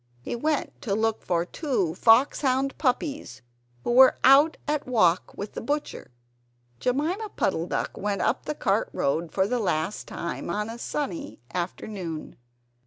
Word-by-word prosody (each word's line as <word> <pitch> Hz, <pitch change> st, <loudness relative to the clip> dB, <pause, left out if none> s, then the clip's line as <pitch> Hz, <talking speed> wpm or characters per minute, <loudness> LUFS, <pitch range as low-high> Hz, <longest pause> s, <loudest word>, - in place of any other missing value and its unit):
He -, -, -3 dB
went 300 Hz, +4 st, -2 dB
to 215 Hz, -8 st, -1 dB
look 225 Hz, 0 st, 0 dB
for 175 Hz, -1 st, 0 dB
two 215 Hz, -, -1 dB
foxhound 265 Hz, -, +3 dB
puppies 275 Hz, -, -1 dB, 0.4 s
who -, -, -1 dB
were 260 Hz, +2 st, +7 dB
out 280 Hz, +5 st, +6 dB
at 300 Hz, -2 st, -1 dB
walk 185 Hz, -8 st, +2 dB
with 200 Hz, +1 st, -6 dB
the -, -, -5 dB
butcher. 290 Hz, +5 st, -3 dB, 0.7 s
Jemima 325 Hz, -, -1 dB
Puddle 170 Hz, -2 st, 0 dB
duck -, -, -2 dB
went 205 Hz, 0 st, -2 dB
up -, -, 0 dB
the 300 Hz, -, -3 dB
cart 205 Hz, -5 st, 0 dB
road 160 Hz, +4 st, -1 dB
for 190 Hz, -, +2 dB
the 245 Hz, +4 st, 0 dB
last 180 Hz, -2 st, -1 dB
time, 170 Hz, 0 st, -5 dB
on 210 Hz, +5 st, -2 dB
a 235 Hz, -, -8 dB
sunny 295 Hz, +3 st, -4 dB
afternoon. 175 Hz, -2 st, -5 dB
230 Hz, 150 wpm, -26 LUFS, 185-280 Hz, 0.7 s, were